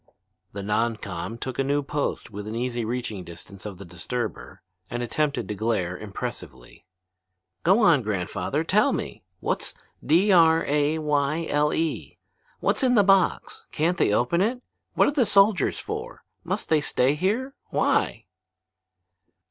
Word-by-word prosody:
The 100 -1 -5
non 110 +3 +1
com 100 +2 -6
took 130 +2 -5
a - - +3
new 145 +1 0
post 145 -4 -3
within 105 +2 -6
easy 120 0 -2
reaching 110 -4 -4
distance 90 +4 -10
of 100 -3 -8
the 100 - -10
disturber 90 +8 -5 0.3
and 120 0 -3
attempted 140 -2 -1
to 105 - -3
glare 100 -4 -1
impressively. 100 -1 -8 0.7
"Go 195 +7 +4
on, 165 -9 +5
grandfather, 100 -5 -2
tell - - +3
me. - - -4 0.2
What's - - -2 0.3
D 175 +8 +4
r 165 -2 +5
a 150 +2 +1
y 150 +1 0
l 150 +1 +2
e? 160 -1 -2 0.4
What's - - +1
in 255 -2 +3
the 205 - +6
box? 195 -2 +2
Can't 170 +3 0
they - - +3
open 125 - +2
it? 245 +5 0 0.3
What - - +4
are - - +2
the 285 -3 +2
soldiers 200 -1 +3
for? 445 +3 -6 0.2
Must - - -3
they 155 -2 +3
stay 135 -1 +2
here? 215 - -1 0.2
Why?" - - +1
140 Hz, 150 wpm, -25 LUFS, 110-175 Hz, 0.7 s, the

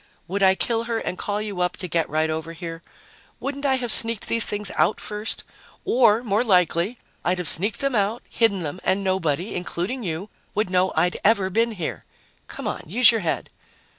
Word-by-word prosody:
"Would 200 +3 -3
I 190 -1 +5
kill 230 +3 0
her 230 -1 -2
and 180 - -4
call 205 +2 -3
you 200 -4 -5
up 180 - -1
to 180 - -4
get 165 -1 -1
right 155 +1 0
over 160 +1 -5
here? 165 -1 -7 0.6
Wouldn't 280 +1 -3
I 265 - +3
have 245 -3 0
sneaked 230 -1 +7
these 230 -1 +1
things 205 -1 -3
out - - +2
first? 210 +1 -3 0.4
Or 235 -2 +3
more 215 0 +1
likely 180 +1 +2 0.3
I'd 180 +1 +1
have 180 -2 -2
sneaked 200 +5 +3
them 275 -1 0
out, 215 +2 0
hidden 200 -6 +1
them 150 +4 -5
and 195 +1 0
nobody 185 -1 -1
including 180 +8 -3
you 180 +1 -4 0.3
would 210 -2 -1
know 185 0 +2
I'd 180 - +1
ever 200 -3 +2
been 230 +3 +1
here. 175 -6 -5 0.4
Come - - -6
on, - - -3
use 225 +6 +5
your 225 -2 -1
head." 165 - -3
200 Hz, 195 wpm, -23 LUFS, 180-225 Hz, 0.6 s, sneaked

